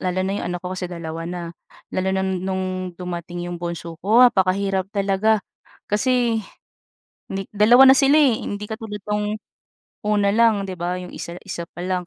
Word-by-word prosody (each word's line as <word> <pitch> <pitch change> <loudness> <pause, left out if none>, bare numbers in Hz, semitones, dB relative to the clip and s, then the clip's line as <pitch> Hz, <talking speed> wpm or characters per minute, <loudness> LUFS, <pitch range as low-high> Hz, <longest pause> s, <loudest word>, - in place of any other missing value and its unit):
lalo 185 0 -1
na 190 - -1
'yong - - -4
anak 175 0 -3
ko 180 - -3
kasi 185 -1 -4
2 165 -1 -6
na, 175 -1 -5 0.5
lalo 185 +1 0
na 190 - 0
noong 185 -1 -3
dumating 175 -1 -5
'yong 175 - -5
bunso 170 -1 -5
ko, 225 +7 +6
apakahirap 195 -3 +2
talaga 200 +1 +1 0.5
kasi 235 +1 +2 0.9
ni 195 0 -3
2 240 +6 +7
na 265 - +8
sila, 280 +2 +5
eh, 260 -7 +4
hindi 205 +1 -4
katulad 220 -2 -6
noong 210 +1 0 0.7
una 205 -1 +3
lang 225 -3 +4
'di - - -3
ba, 175 +1 -1
'yong 180 - -9
isa 170 +1 -7
isa 170 - -5
pa 175 - -10
lang 180 -1 -2
190 Hz, 175 wpm, -22 LUFS, 180-210 Hz, 0.9 s, na